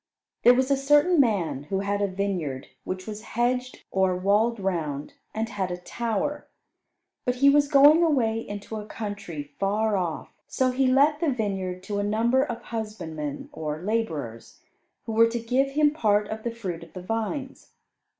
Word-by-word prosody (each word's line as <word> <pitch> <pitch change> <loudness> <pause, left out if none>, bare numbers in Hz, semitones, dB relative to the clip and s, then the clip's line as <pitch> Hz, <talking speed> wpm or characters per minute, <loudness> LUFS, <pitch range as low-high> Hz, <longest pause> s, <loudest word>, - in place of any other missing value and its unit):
There 245 +1 +7
was 260 +2 +1
a 275 - +4
certain 295 +5 +4
man 190 - +1
who 190 +5 -1
had 200 0 -1
a 200 - +2
vineyard 185 -9 -3 0.2
which 185 0 -4
was 215 -1 -6
hedged 250 +3 -2
or 190 -1 +2
walled 210 +5 +2
round, 160 -7 -2 0.2
and 220 +1 -2
had 195 -5 -3
a 175 - -3
tower. 235 +9 -3 0.8
But 250 - 0
he 280 +2 +5
was 290 0 +4
going 290 +3 +7
away 250 -9 +2
into 205 0 -6
a 210 - -6
country 200 -9 -5 0.2
far 210 +2 +1
off, 175 -4 -3
so 255 -1 +1
he 260 +1 +2
let 285 +4 +4
the 335 - +1
vineyard 195 -7 -2
to 205 +1 -3
a - - 0
number 230 +5 +2
of 240 -5 -5
husbandmen, 165 -10 -5
or 155 +1 -5
labourers, 160 - -3 0.4
who 225 - -4
were 225 +1 +5
to 235 +1 -2
give 260 +4 0
him 295 0 +4
part 210 -8 +2
of 220 0 -4
the 235 - -2
fruit 195 -8 -5
of - - -13
the 185 - -8
vines. 225 +7 -4
220 Hz, 175 wpm, -26 LUFS, 190-255 Hz, 0.8 s, There